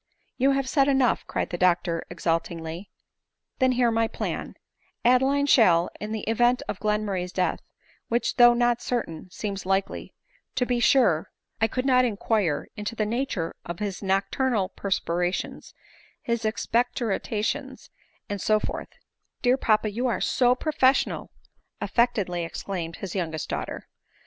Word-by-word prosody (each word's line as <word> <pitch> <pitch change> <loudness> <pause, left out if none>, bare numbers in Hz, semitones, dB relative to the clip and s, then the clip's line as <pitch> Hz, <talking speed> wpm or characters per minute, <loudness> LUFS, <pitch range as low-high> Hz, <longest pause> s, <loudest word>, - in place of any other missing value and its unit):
" - - -45
You, 270 +2 +4
have 270 -1 0
said 275 0 +3
enough," 265 -3 +2
cried - - -2
the 175 - -4
doctor 175 -2 +2
exultingly; 165 +1 -3 0.7
"then 260 -1 +4
hear 245 -1 +3
my 225 0 +2
planj - - -4 0.5
Adeline 265 +3 +4
shall, 180 -11 +5
in 210 +1 -5
the 220 -1 -3
event 240 +2 +2
of 195 - -4
Glenmurray's 210 -4 -1
death, 185 -1 0 0.5
which 235 +2 0
though 240 -1 +8
not 240 0 +2
certain, 185 -9 -3
seems 200 +1 -5
likely 195 +1 -2 0.2
— - - -39
to 250 - +1
be 245 -1 0
sure, 235 - +3 0.3
I 220 - +5
could 255 +3 -3
not 255 -2 +5
inquire 205 -8 0
into 210 +2 -4
the 215 - 0
nature 220 -7 -2
of 170 0 -6
his 200 -2 -4
nocturnal 195 +2 0
perspirations, 180 -3 -2 0.5
his 235 -1 -1
expectoration, 230 +3 -1 0.5
and 205 -2 -4
so 215 0 +3
forth—" - - -5 0.3
" - - -51
Dear 250 +1 +5
papa, 215 -4 +1
you 240 +5 -2
qre 235 -7 0
so 250 -1 +3
professional 270 -2 +1 0.3
!" - - -46
affectedly 205 -8 +1
ex 165 - -6
claimed 170 -4 -4
his 190 -4 -6
youngest 160 -5 -3
daughter. - - -4
215 Hz, 150 wpm, -26 LUFS, 185-245 Hz, 0.7 s, though